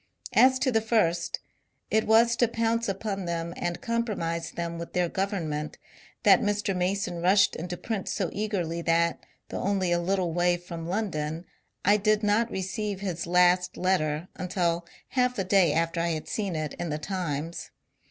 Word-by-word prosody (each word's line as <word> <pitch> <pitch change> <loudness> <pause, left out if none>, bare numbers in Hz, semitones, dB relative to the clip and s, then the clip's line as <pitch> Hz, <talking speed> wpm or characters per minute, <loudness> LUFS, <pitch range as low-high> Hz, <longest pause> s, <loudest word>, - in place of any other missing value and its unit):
As 260 0 +6
to 260 0 +1
the 225 -2 +2
first, 210 -7 +1 0.5
it 220 0 +2
was 230 +2 +5
to 240 - +4
pounce 230 0 0
upon 195 -1 -3
them 170 0 -3
and 175 0 -3
compromise 210 -9 -2
them 170 -1 -4
with 170 - -7
their 180 -1 +2
government 165 -6 -2 0.5
that - - +6
Mr. 205 -2 0
Mason 180 -1 -1
rushed 195 +3 +4
into 175 +2 -5
print 215 -1 -3
so 190 -5 -1
eagerly 185 -6 -2
that, 170 0 +1 0.3
though - - -4
only 190 -2 0
a 175 - +3
little 180 -1 0
way 175 +1 +2
from 170 -2 -7
London, 170 -5 -2 0.4
I 205 +2 +6
did 215 +1 +2
not 210 +3 +2
receive 195 +1 -3
his 180 -4 -3
last 180 +1 +3
letter 165 -3 0
until 175 -2 -1 0.2
half 250 -1 +1
a 195 - +1
day 185 -3 +4
after 165 +2 0
I 170 - 0
had 155 - -5
seen 200 -5 -2
it 155 -2 -3
in 175 - -2
the 150 - -1
^* - - -20
Times." 165 -3 -3
180 Hz, 170 wpm, -27 LUFS, 170-205 Hz, 0.5 s, As